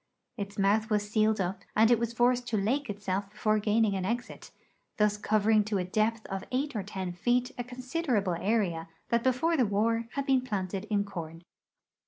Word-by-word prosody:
Its 200 0 -6
mouth 210 +3 +2
was 210 -1 +1
sealed 215 0 +2
up, 190 +1 -2
and 220 +2 +5
it 235 - +5
was 235 -1 -1
forced 245 +1 +2
to 230 -3 0
lake 245 +7 0
itself 200 -1 -3
before 215 +1 +1
gaining 210 0 +2
an 190 - -2
exit, 235 +5 -4 0.5
thus 210 -1 +3
covering 215 0 +3
to 205 -1 -1
a 185 - 0
depth 215 +4 0
of 195 -1 -4
eight 275 +2 -1
or 210 - 0
ten 190 -2 -5
feet 245 +7 +1
a 245 - -3
considerable 250 - -1
area 175 -3 0 0.2
that 235 0 +2
before 260 +7 +2
the 265 - +3
war 225 +2 +1
had 280 -1 -2
been 265 -2 +3
planted 195 -5 -3
in 210 -2 +1
corn. 165 -4 -7
215 Hz, 190 wpm, -29 LUFS, 200-240 Hz, 0.5 s, and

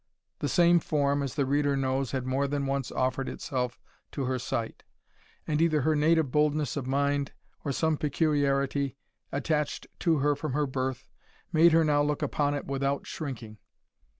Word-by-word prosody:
The 145 - -1
same 175 +3 +5
form, 145 -2 +1
as 135 -3 -3
the 140 - +1
reader 140 +1 +1
knows, 135 -1 0
had 130 -2 -2
more 135 +2 0
than 140 0 -1
once 135 -1 -2
offered 130 +1 -1
itself 125 -2 -3 0.3
to 140 - -2
her 130 0 -1
sight; 115 -1 -3 0.6
and 150 +1 0
either 155 -3 +3
her 155 +3 +2
native 155 -2 +3
boldness 150 -2 +1
of 135 -3 -3
mind, 140 +1 0 0.3
or 145 - -1
some 160 +3 +1
peculiarity 140 -2 +1 0.3
attached 150 +1 -1
to 165 -2 +2
her 145 +1 +2
from 145 -1 -4
her 150 +1 +1
birth, 130 -1 -3 0.5
made 165 +1 +6
her 165 +1 +5
now 145 -1 +3
look 145 0 0
upon 145 -1 0
it 145 - -4
without 140 0 -1
shrinking. 115 -8 -6
140 Hz, 170 wpm, -28 LUFS, 135-150 Hz, 0.6 s, made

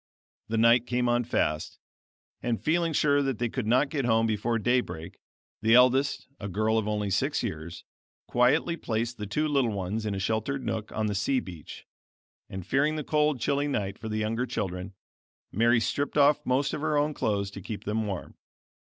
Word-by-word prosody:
The 115 - -1
night 115 +2 +5
came 125 0 0
on 120 0 +2
fast; 75 -9 -1 0.6
and 120 -2 -1
feeling 170 +1 +1
sure 145 -1 +3
that 135 -4 -1
they 120 +1 -1
could 120 -2 -3
not 130 +5 +3
get 145 -3 -1
home 115 -1 +3
before 115 +1 0
day 125 +3 +2
break, 80 -8 -9 0.4
the 110 +1 +5
eldest 130 +3 +4
(a 100 - -5
girl 110 +4 +1
of 110 - -3
only 105 -2 -1
six 135 +10 0
years) 85 -6 -5 0.4
quietly 140 +7 +2
placed 115 -1 -3
the 105 - -4
two 150 +10 0
little 140 -5 +2
ones 105 +2 -3
in 100 - -2
a - - -3
sheltered 110 +7 -1
nook 110 -1 -3
on 110 - -1
the 105 - -1
sea 110 +7 +1
beach; 85 -9 -10 0.6
and 95 -2 -6
fearing 145 +3 +1
the 155 - -3
cold 150 -2 +1
chilly 140 +4 0
night 100 -8 -2
for 110 - -6
the 110 - -2
younger 115 +4 -1
children, 95 -3 -4 0.6
Mary 115 +4 +3
stripped 145 +6 -1
off 145 +1 +4
most 135 +2 +1
of - - -3
her 155 -1 +1
own 150 +1 +1
clothes 100 -6 -1
to 100 - -8
keep 105 +3 -6
them 105 +1 -1
warm. 95 -3 -5
115 Hz, 195 wpm, -28 LUFS, 105-140 Hz, 0.6 s, night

